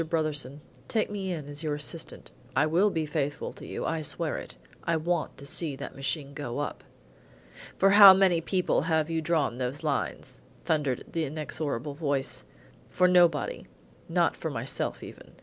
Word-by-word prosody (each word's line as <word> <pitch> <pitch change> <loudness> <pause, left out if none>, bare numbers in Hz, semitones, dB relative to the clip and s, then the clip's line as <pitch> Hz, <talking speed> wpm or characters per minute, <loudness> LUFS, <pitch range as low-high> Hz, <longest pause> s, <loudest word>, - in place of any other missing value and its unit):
Brotherson, 150 -4 -1 0.3
take 215 -2 0
me 195 -2 -3
in 155 -5 -5
as 145 0 -7
your 155 -2 -1
assistant. 145 - -4 0.2
I 150 - +4
will 175 +7 +3
be 160 -5 -1
faithful 145 -1 -3
to - - -11
you, - - -4
I 165 -1 -1
swear 150 - -2
it. - - -9 0.3
I 165 -1 +1
want 170 +1 -2
to 140 - -10
see 145 0 +1
that - - -8
machine 140 +1 -2
go 140 -4 -5
up." 145 - -4 0.9
"For 195 0 +5
how 200 -1 +11
many 185 -3 +3
people 180 +2 +1
have 160 0 +1
you 165 -1 0
drawn 155 -6 0
those 130 +5 -3
lines?" 135 - -3 0.2
thundered 145 -6 0
the 165 -1 -1
inexorable 145 -2 -3
voice. 140 -3 -2 0.4
"For 180 - +3
nobody; 175 -5 +3 0.4
not - - +2
for - - -4
myself - - -3
even. - - -12
155 Hz, 165 wpm, -28 LUFS, 145-170 Hz, 0.9 s, how